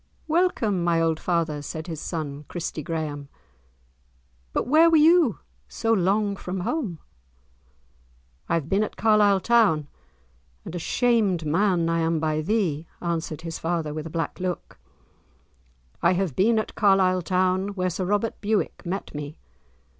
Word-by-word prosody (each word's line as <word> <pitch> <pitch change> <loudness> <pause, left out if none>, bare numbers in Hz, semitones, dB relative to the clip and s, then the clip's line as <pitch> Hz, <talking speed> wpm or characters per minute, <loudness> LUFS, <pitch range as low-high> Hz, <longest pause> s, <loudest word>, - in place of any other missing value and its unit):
"Welcome, 305 - +1
my 170 -1 +2
old 165 -1 +1
father," 165 -4 -1
said 155 +2 -6
his 160 -4 -6
son, 150 -3 -5
Christie 165 -2 -4
Graeme, 150 -2 -4 1.2
"but - - -1
where 315 +5 +6
were 325 - +5
ye 315 - +5 0.3
so 225 - 0
long 200 +1 +1
from 185 -1 -5
home?" 210 - -2 1.5
"I 170 - +2
have 160 -4 -2
been 195 +5 +2
at 215 - -5
Carlisle 210 -3 +4
town, 205 -11 +3 0.8
and - - -7
a 175 - -3
shamed 210 -5 +1
man 175 +2 +2
I 165 0 +1
am 165 0 +1
by 155 0 0
thee," 170 -4 -1
answered 165 -2 -3
his 165 -1 -6
father 165 -3 -2
with 155 +1 -5
a - - -7
black 165 +1 -3
look; 180 -1 -4 1.2
"I 170 - +4
have 180 -6 -1
been 225 +4 +3
at 220 - -2
Carlisle 190 -3 +3
town, 185 +2 +1
where 185 -1 -1
Sir 185 +2 -3
Robert 205 +4 -1
Bewick 215 0 -1
met 190 +2 -4
me. 150 0 -6
180 Hz, 150 wpm, -25 LUFS, 160-205 Hz, 1.5 s, where